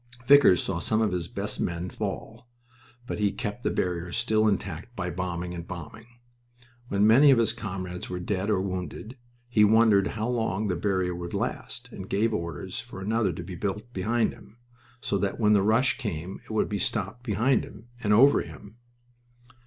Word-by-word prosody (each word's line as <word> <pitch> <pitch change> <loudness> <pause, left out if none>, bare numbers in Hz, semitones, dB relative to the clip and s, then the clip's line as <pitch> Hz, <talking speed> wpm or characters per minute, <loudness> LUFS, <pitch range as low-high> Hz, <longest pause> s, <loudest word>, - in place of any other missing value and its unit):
Vickers 140 -10 +7
saw 95 -3 -2
some 110 +5 0
of 110 -3 +2
his 90 -2 -2
best - - -4
men 85 +1 -2
fall, 110 +3 -6 0.6
but 120 - -4
he 105 -1 +2
kept 110 +1 -5
the - - 0
barrier 90 -1 -2
still 110 0 +2
intact 100 +2 -2
by 90 -4 -3
bombing 90 0 -3
and 85 -1 -7
bombing. 90 +6 -8 0.8
When 100 -2 +2
many 130 +7 +7
of 135 - +6
his 115 -1 +2
comrades 95 -5 -5
were 90 - -3
dead 95 +2 -2
or 105 -3 +2
wounded, 95 +5 -5 0.3
he 115 -3 +4
wondered 105 -2 +5
how 110 +1 -3
long 110 -4 -1
the 90 - +1
barrier 95 0 0
would 85 0 -5
last, 125 - -4
and 95 -3 -8
gave 110 +3 +1
orders 85 -6 -4
for - - -8
another 105 0 +1
to 85 +1 -6
be 90 +2 -8
built 105 +6 -4
behind 110 +5 +1
him, 115 - -17 0.4
so 100 - -1
that 100 0 -2
when 105 -2 +4
the 100 - +5
rush 110 +6 +2
came 90 -3 -5
it - - -20
would 110 -1 +1
be 105 -1 -3
stopped 105 +7 -2
behind 120 +2 +1
him 110 +3 -12
and 105 - 0
over 135 +7 +6
him. 105 +2 -11
105 Hz, 185 wpm, -27 LUFS, 90-115 Hz, 0.8 s, Vickers